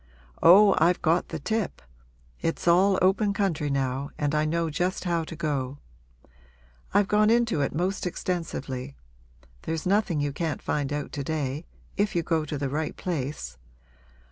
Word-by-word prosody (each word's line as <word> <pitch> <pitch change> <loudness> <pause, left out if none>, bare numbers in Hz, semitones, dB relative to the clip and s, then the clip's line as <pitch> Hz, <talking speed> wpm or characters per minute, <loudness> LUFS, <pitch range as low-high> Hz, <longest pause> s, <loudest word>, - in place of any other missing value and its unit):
Oh, 195 +3 +8
I've 170 +3 +3
got 165 +3 +2
the 165 - -4
tip! 220 +6 -2 0.6
It's 165 +1 -2
all 185 +3 +5
open 200 +2 +3
country 180 -8 0
now 135 0 -1
and 145 -1 -1
I 150 0 +2
know 165 +1 0
just 180 +4 -1
how 170 -3 0
to 165 - -8
go. 145 -4 -2 1.1
I've 200 0 +3
gone 210 +1 +4
into 235 -8 +2
it 140 - -1
most 185 +3 -1
extensively; 145 -7 -4 0.7
there's 160 -1 -3
nothing 195 -4 +2
you 145 -1 -1
can't 160 0 -2
find 145 -1 -2
out 145 0 -3
to 140 - -4
day 150 +1 -3 0.3
if 205 -1 0
you 170 - +1
go 160 -1 0
to 150 0 -4
the 140 0 -2
right 150 +3 -3
place. 140 - -4
160 Hz, 160 wpm, -26 LUFS, 145-185 Hz, 1.1 s, Oh